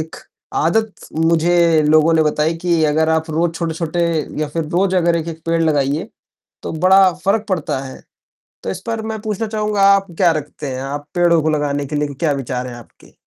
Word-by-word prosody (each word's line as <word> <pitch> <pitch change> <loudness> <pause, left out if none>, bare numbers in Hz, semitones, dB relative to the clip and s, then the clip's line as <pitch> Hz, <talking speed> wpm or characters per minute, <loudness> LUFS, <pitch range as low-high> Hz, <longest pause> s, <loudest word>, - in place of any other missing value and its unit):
एक 160 +1 -7 0.5
आदत 220 +5 +1 0.3
मुझे 165 -1 +3
लोगों 155 +1 +4
ने 160 - +4
बताई 155 +1 0
कि 170 -2 +2
अगर 155 +1 +2
आप 160 0 0
रोज़ 165 +2 0
छोटे-छोटे 165 0 -3 0.4
या 155 - -1
फिर 160 +2 -3
रोज़ 185 +3 +1
अगर 170 -1 +2
एक-एक 165 0 -5
पेड़ 165 0 +1
लगाइए, 150 +4 0 0.5
तो - - -5
बड़ा 185 +3 +5
फ़र्क 210 +2 +1
पड़ता 170 -8 -1
है, 130 - -10 0.6
तो - - -3
इस - - -6
पर 225 -1 -2
मैं 220 - -5
पूछना 215 0 -3
चाहूँगा, 210 -1 -1
आप 195 0 -1
क्या 180 -3 +4
रखते 150 -2 -5
हैं? 130 - -5
आप 145 +2 -5
पेड़ों 170 -2 +3
को 155 - 0
लगाने 145 -2 -1
के 150 +2 -5
लिए 145 -1 -1
क्या 150 +2 0
विचार 125 +1 -4
हैं 120 - -8
आपके? 120 -2 -16
165 Hz, 195 wpm, -18 LUFS, 150-180 Hz, 0.6 s, बड़ा